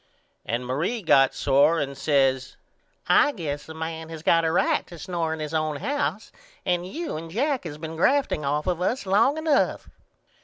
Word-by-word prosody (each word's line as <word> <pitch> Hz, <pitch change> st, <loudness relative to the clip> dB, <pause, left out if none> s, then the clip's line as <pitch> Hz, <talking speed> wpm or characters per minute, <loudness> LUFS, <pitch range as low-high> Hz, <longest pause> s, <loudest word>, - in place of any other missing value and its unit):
And 120 Hz, +3 st, -2 dB
Marie 165 Hz, -, -2 dB
got 135 Hz, -5 st, +4 dB
sore 145 Hz, +5 st, +3 dB
and 140 Hz, -1 st, -3 dB
says 135 Hz, -2 st, +1 dB, 0.5 s
I 295 Hz, -, +5 dB
guess 150 Hz, -, -5 dB
a 160 Hz, -, -8 dB
man 160 Hz, 0 st, -5 dB
has 160 Hz, -1 st, -8 dB
got 165 Hz, 0 st, +4 dB
a 160 Hz, -, +1 dB
right 175 Hz, -, +1 dB
to 175 Hz, -, -11 dB
snore 170 Hz, -1 st, -3 dB
in 160 Hz, -, -4 dB
his 155 Hz, 0 st, -5 dB
own 155 Hz, -1 st, 0 dB
house 285 Hz, -, -2 dB, 0.3 s
and 180 Hz, -1 st, 0 dB
you 320 Hz, -, -5 dB
and 165 Hz, +1 st, -7 dB
Jack 260 Hz, -, -1 dB
has 150 Hz, -3 st, -6 dB
been 160 Hz, +1 st, -7 dB
grafting 265 Hz, -, +2 dB
off 145 Hz, +2 st, -1 dB
of 180 Hz, -1 st, -1 dB
us 215 Hz, +4 st, -1 dB
long 220 Hz, +10 st, +3 dB
enough. 315 Hz, -3 st, 0 dB
160 Hz, 185 wpm, -25 LUFS, 150-190 Hz, 0.5 s, I